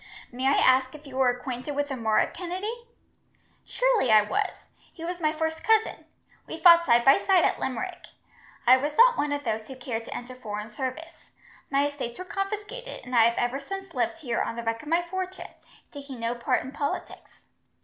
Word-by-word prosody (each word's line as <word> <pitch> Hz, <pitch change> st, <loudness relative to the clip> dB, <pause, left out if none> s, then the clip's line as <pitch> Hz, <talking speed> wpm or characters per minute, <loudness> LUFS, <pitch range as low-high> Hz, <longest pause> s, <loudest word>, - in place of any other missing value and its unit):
May 255 Hz, +2 st, -2 dB
I 275 Hz, -, +4 dB
ask 260 Hz, +1 st, +3 dB
if 300 Hz, 0 st, -13 dB
you 270 Hz, -2 st, -10 dB
were 260 Hz, -2 st, +4 dB
acquainted 250 Hz, +3 st, -4 dB
with 285 Hz, 0 st, -1 dB
a -, -, -1 dB
Murroch 220 Hz, -3 st, +1 dB
Kennedy?" 385 Hz, +7 st, -5 dB, 0.8 s
"Surely -, -, +1 dB
I 215 Hz, -1 st, +7 dB
was. 210 Hz, -, 0 dB, 0.4 s
He 330 Hz, -, -9 dB
was 355 Hz, +1 st, -4 dB
my 310 Hz, -1 st, +2 dB
first 320 Hz, 0 st, -3 dB
cousin. 445 Hz, 0 st, +2 dB, 0.4 s
We 325 Hz, -, -6 dB
fought 340 Hz, 0 st, +7 dB
side 235 Hz, -1 st, +4 dB
by 275 Hz, -, +7 dB
side 375 Hz, -4 st, +3 dB
at -, -, 0 dB
Limerick. 360 Hz, +7 st, -4 dB, 0.6 s
I 255 Hz, +2 st, +8 dB
was 290 Hz, +3 st, -3 dB
not -, -, +7 dB
one 290 Hz, -7 st, -1 dB
of 290 Hz, 0 st, -2 dB
those 220 Hz, -3 st, -3 dB
who 265 Hz, -, -8 dB
cared 245 Hz, -3 st, -4 dB
to -, -, -7 dB
enter 245 Hz, +1 st, -8 dB
foreign 210 Hz, -3 st, -6 dB
service. 270 Hz, +9 st, -6 dB, 0.4 s
My 280 Hz, +1 st, +2 dB
estates 275 Hz, -5 st, -5 dB
were 370 Hz, -, -7 dB
confiscated, 415 Hz, +5 st, -5 dB
and 250 Hz, 0 st, -4 dB
I 230 Hz, -1 st, +7 dB
have 235 Hz, 0 st, +1 dB
ever 245 Hz, +3 st, 0 dB
since 390 Hz, +7 st, -7 dB
lived -, -, -1 dB
here 250 Hz, -8 st, -2 dB
on -, -, -3 dB
the 235 Hz, -, -5 dB
wreck 230 Hz, 0 st, -2 dB
of 300 Hz, -, -13 dB
my 335 Hz, +2 st, +2 dB
fortune, 370 Hz, +1 st, -5 dB, 0.4 s
taking 280 Hz, -3 st, -9 dB
no 230 Hz, +1 st, -1 dB
part 240 Hz, -1 st, 0 dB
in 260 Hz, -, -8 dB
politics. 285 Hz, 0 st, -5 dB
285 Hz, 200 wpm, -26 LUFS, 245-350 Hz, 0.8 s, I